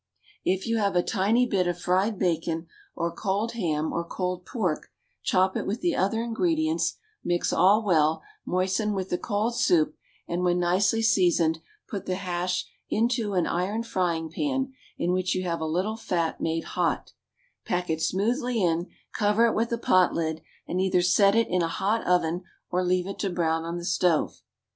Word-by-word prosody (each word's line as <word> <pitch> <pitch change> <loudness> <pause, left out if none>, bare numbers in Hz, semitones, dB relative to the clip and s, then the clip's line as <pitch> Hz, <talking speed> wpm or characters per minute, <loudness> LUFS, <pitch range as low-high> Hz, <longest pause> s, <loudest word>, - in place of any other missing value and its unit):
If 190 +1 0
you 230 0 0
have 200 -3 +1
a 175 - +3
tiny 225 +4 +2
bit 195 -7 +1
of 175 -1 -1
fried 190 +5 +1
bacon 165 -2 -1 0.3
or 170 0 -1
cold 205 +4 -1
ham 160 -9 -1
or 170 - -1
cold 180 +1 -4
pork, 185 - -2 0.3
chop 185 0 +2
it - - -2
with 210 +5 -2
the 345 -3 +1
other 225 +5 +1
ingredients, 315 +7 0 0.3
mix 175 0 0
all 200 +5 +5
well, 160 -5 +2 0.2
moisten 190 +4 0
with 190 -1 -3
the 175 - 0
cold 215 +2 -1
soup, 175 -11 +2 0.3
and, 175 +1 -2
when 180 0 +2
nicely 190 +5 +2
seasoned, 175 -6 +3 0.3
put 200 - -6
the 185 - 0
hash 180 -1 -2 0.2
into 225 -2 0
an 180 - +2
iron 195 +6 -1
frying 175 -7 -1
pan, 265 - -1 0.2
in 175 - 0
which 185 0 0
you 185 - -1
have 170 -2 -2
a 160 - -1
little 185 +7 -1
fat 170 -6 -2
made 165 0 -1
hot; - - -1 0.5
pack 180 0 -1
it 160 -1 -1
smoothly 235 - 0
in, 170 -1 +1 0.3
cover 210 +2 +3
it 230 - +2
with 230 +2 0
a 235 - +1
pot 185 -5 +3
lid, 160 -1 -2 0.3
and 185 - -1
either 185 -2 +2
set 200 +3 +4
it 230 0 +3
in 180 0 +1
a 165 - +1
hot 205 +6 0
oven, 175 -1 +2 0.3
or 180 +1 +1
leave 180 0 +1
it 195 - -6
to 200 - 0
brown 165 -2 0
on 170 +1 -4
the 175 - -6
stove. 175 -2 +1
185 Hz, 185 wpm, -26 LUFS, 175-215 Hz, 0.5 s, all